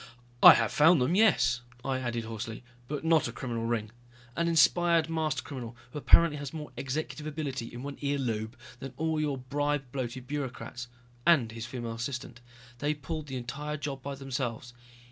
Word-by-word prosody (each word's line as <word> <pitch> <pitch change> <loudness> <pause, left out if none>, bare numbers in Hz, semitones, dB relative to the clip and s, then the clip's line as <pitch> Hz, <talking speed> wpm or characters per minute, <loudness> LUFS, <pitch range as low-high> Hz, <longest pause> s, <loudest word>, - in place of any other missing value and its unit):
"I - - +12
have 115 -2 +1
found 160 +2 +6
them, 125 +7 +2
yes," 195 - +4 0.2
I 130 -1 -1
said 120 -2 -2
hoarsely. 110 +1 -6 0.2
"But 150 +2 -4
not 160 -4 +4
a - - -4
criminal 115 -1 -3
ring. 110 -2 -1 0.4
An 170 0 +1
inspired 170 0 +4
master 155 -2 -1
criminal 120 -4 -7
who 150 - -5
apparently 165 +1 +5
has 145 0 -6
more 150 -1 -6
executive 150 +2 -4
ability 145 -6 -4
in 120 +1 -8
one 140 0 -6
ear 140 0 0
lobe 115 -2 -3 0.2
than 135 -1 -8
all 160 -1 0
your 145 -3 -1
bribe 145 +2 -1
bloated 130 -1 -4
bureaucrats 130 -3 -5 0.4
and 135 -9 +4
his 115 +1 -6
female 120 -2 -5
assistant. 120 0 -5 0.4
They 145 +3 0
pulled 155 +1 -5
the 135 -2 -4
entire 145 +5 -4
job 140 -2 -5
by 140 +2 -5
themselves. 130 -3 -4
135 Hz, 175 wpm, -29 LUFS, 120-150 Hz, 0.4 s, I